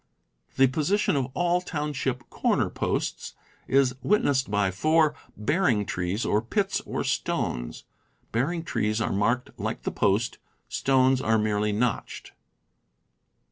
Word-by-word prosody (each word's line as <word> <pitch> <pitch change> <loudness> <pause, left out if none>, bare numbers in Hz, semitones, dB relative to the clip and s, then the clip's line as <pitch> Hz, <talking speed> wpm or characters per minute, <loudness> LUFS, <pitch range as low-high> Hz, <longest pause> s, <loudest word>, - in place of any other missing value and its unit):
The 135 - +6
position 155 +9 +1
of 135 -3 0
all 175 0 +2
township 145 -6 -3
corner - - +1
posts - - -2 0.3
is 135 -1 +3
witnessed 140 - +2
by 100 -2 +1
four 155 - +3
" 120 - -29
bearing 115 - +1
trees," 90 +5 -2
or 105 - +2
pits, 195 - -1
or - - -2
stones. - - -2 0.5
Bearing 160 +9 0
trees 110 -8 -1
are 110 - -1
marked 115 +6 0
like - - -3
the - - -2
post; 105 +4 +1 0.3
stones 130 -1 +2
are 110 -3 +2
merely 105 -1 +1
notched. 110 +2 -2
125 Hz, 130 wpm, -26 LUFS, 105-150 Hz, 0.5 s, The